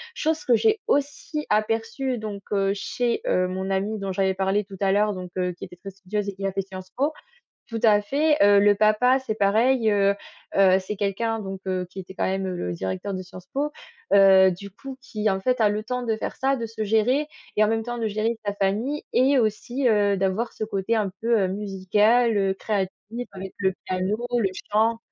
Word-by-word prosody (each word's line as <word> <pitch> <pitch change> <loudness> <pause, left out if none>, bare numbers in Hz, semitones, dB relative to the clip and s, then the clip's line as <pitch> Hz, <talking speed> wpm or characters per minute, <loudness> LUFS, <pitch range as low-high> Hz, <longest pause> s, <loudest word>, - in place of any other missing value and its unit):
chose 315 0 -1
que 245 - +5
j'ai 435 - +2
aussi 295 +2 -1
aperçue 225 +4 0
donc, 210 -2 -6
heu, 195 -1 +2
chez, 225 +4 -5 0.2
heu, 185 0 +2
mon 190 +1 -3
amie 200 +3 -1
dont 195 -1 -3
j'avais 190 0 +1
parlé 195 +2 0
tout 195 -1 -11
à 195 -1 +2
l'heure 210 +1 +2
donc, 185 -1 -7
heu, 180 0 0
qui 175 - -9
était - - -13
très 195 +3 -9
studieuse 200 +2 -4
et 200 - -7
qui 195 +1 -5
a 195 - -1
fait 195 - 0
Sciences 185 -1 -10
Po. 285 +4 +1 0.6
Tout 230 -2 -4
à 210 -2 +5
fait, 295 +8 +2
heu, 200 0 +6
le 205 0 +5
papa 215 +5 +4
c'est 240 -5 -4
pareil, 220 +4 +3
heu 200 -1 +3 0.4
heu, 190 -1 +6
c'est 195 +2 -5
quelqu'un 220 +3 -1
donc, 195 -2 -6
heu, 185 -1 -2
qui 190 - -9
était 190 0 -9
quand - - -1
même 190 0 -1
le 130 - -3
directeur 95 - -4
de 185 - -4
Sciences 180 0 -12
Po, 290 +2 -1 0.4
heu, 190 -1 +7
du 200 +3 -8
coup 265 +7 -10
qui, 215 -4 -2
en 190 - -1
fait, 250 +5 0
a 210 - +5
le 210 +1 -1
temps 250 +2 -3
de 225 -2 0
faire - - -4
ça, 270 +1 +1
de 230 - -3
se 220 0 -4
gérer 225 +8 +2 0.3
et, 215 - +4
en - - +3
même 225 0 0
temps, 240 +1 -4
de 225 - 0
gérer 220 +2 -1
sa 205 - -1
famille 210 +9 -1
et 265 +2 +4
aussi, 240 +4 0
heu, 205 -2 +3
d'avoir 195 +5 0
ce - - -4
côté 205 +2 -1
un 205 -3 0
peu, 230 0 +2
heu, 190 - +2
musical, 210 +4 +2
heu, 195 -1 +2
créatif, 195 -1 -2 0.4
avec 190 -1 -8
le 190 -1 +2
piano, 185 +3 -1 0.2
le 205 -5 +2 0.2
chant. 225 +2 +3
205 Hz, 220 wpm, -24 LUFS, 195-230 Hz, 0.6 s, heu